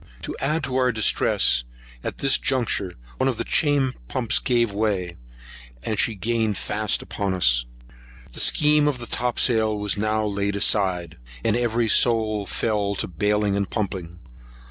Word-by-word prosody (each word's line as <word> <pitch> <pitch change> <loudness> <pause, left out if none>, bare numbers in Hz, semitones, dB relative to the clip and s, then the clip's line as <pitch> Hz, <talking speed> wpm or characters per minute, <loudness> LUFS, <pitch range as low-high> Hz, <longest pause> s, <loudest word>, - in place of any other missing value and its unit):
To - - -5
add 150 +3 -1
to 130 -2 -2
our 125 -1 +2
distress, 105 - +2 0.4
at - - -5
this 135 -1 +2
juncture 115 -8 -1 0.2
one 130 - +2
of 125 - -3
the - - -2
chain 145 -4 +1
pumps 120 - +1
gave 120 -4 +1
way; 100 -5 -1 0.7
and 110 - -2
she 115 - +1
gained 110 0 -1
fast 105 0 -1
upon 100 -2 -3
us. - - +2 0.7
The - - -8
scheme 150 0 +4
of 145 -3 0
the 120 - -7
topsail 115 -3 +1
was 105 0 0
now 110 0 0
laid 100 0 -2
aside, 95 - 0 0.3
and 110 - +2
every 120 -1 0
soul 110 -3 +2
fell 105 -3 -1
to - - -3
baling 105 +3 0
and 100 -2 -1
pumping. 95 -5 -4
110 Hz, 155 wpm, -23 LUFS, 100-120 Hz, 0.7 s, scheme